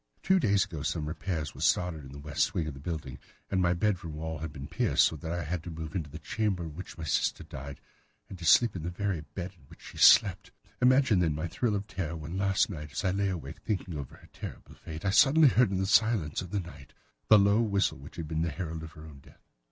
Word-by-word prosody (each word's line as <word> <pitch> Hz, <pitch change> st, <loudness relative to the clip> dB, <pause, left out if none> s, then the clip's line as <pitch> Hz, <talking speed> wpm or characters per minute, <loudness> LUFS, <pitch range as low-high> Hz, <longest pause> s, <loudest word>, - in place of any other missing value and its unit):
Two 190 Hz, +1 st, +4 dB
days 100 Hz, -, +3 dB
ago 85 Hz, -6 st, -7 dB
some 75 Hz, +1 st, -2 dB
repairs 75 Hz, -1 st, -3 dB
were -, -, -11 dB
started 85 Hz, -4 st, +1 dB
in 65 Hz, -, -11 dB
the 70 Hz, -, -9 dB
west 70 Hz, 0 st, -1 dB
wing 80 Hz, -, 0 dB
of 75 Hz, -, -5 dB
the 70 Hz, -, -11 dB
building, 70 Hz, -4 st, -5 dB, 0.3 s
and 95 Hz, -1 st, +2 dB
my 90 Hz, -1 st, +3 dB
bedroom 85 Hz, -5 st, -1 dB
wall 80 Hz, 0 st, -4 dB
has 80 Hz, +1 st, -4 dB
been 70 Hz, -2 st, -8 dB
pierced, -, -, +2 dB
so -, -, 0 dB
that 80 Hz, +2 st, -6 dB
I 85 Hz, -, -1 dB
have 85 Hz, -, -3 dB
had 85 Hz, 0 st, -3 dB
to -, -, -5 dB
move 80 Hz, -1 st, -6 dB
into 80 Hz, -5 st, -3 dB
the 75 Hz, -, -8 dB
chamber 95 Hz, +3 st, -2 dB
in 80 Hz, -3 st, -7 dB
which 95 Hz, +1 st, -9 dB
my 80 Hz, -, -6 dB
sister 80 Hz, -, 0 dB
died, 70 Hz, +1 st, -8 dB, 0.5 s
and 95 Hz, -, -10 dB
to -, -, -9 dB
sleep 115 Hz, +7 st, +5 dB
in 90 Hz, -, -4 dB
the 85 Hz, -, -3 dB
very 95 Hz, -2 st, -2 dB
bed 90 Hz, +3 st, -7 dB
in 80 Hz, -6 st, -23 dB
which -, -, -17 dB
she -, -, -11 dB
slept. -, -, +6 dB, 0.3 s
Imagine, 130 Hz, -5 st, +5 dB
then, 80 Hz, -4 st, +1 dB
my 80 Hz, +3 st, -3 dB
thrill 105 Hz, +5 st, -1 dB
of 100 Hz, 0 st, -3 dB
terror 85 Hz, -5 st, -4 dB
when 80 Hz, +2 st, -6 dB
last 95 Hz, 0 st, +2 dB
night, 75 Hz, -7 st, -8 dB
as 100 Hz, -, -3 dB
I 95 Hz, -, +3 dB
lay 100 Hz, +1 st, 0 dB
awake, 80 Hz, -8 st, -6 dB
thinking 95 Hz, -5 st, -3 dB
over 70 Hz, -3 st, -7 dB
her -, -, -18 dB
terrible -, -, -9 dB
fate, 80 Hz, +2 st, -9 dB
I 100 Hz, -, +2 dB
suddenly 145 Hz, +7 st, +6 dB
heard 125 Hz, -3 st, +4 dB
in 95 Hz, -, -1 dB
the 95 Hz, -, 0 dB
silence 105 Hz, -7 st, +2 dB
of 90 Hz, -, -8 dB
the 100 Hz, -, -1 dB
night 85 Hz, -6 st, -12 dB, 0.3 s
the 110 Hz, -, +8 dB
low 100 Hz, +2 st, +4 dB
whistle 100 Hz, -, +1 dB
which 70 Hz, -, -12 dB
had 80 Hz, -2 st, -5 dB
been 80 Hz, 0 st, -2 dB
the 85 Hz, -, 0 dB
herald 80 Hz, +1 st, -5 dB
of 80 Hz, 0 st, -9 dB
her 80 Hz, -2 st, -12 dB
own 75 Hz, -3 st, -12 dB
death. -, -, -21 dB
85 Hz, 260 wpm, -29 LUFS, 75-100 Hz, 0.5 s, the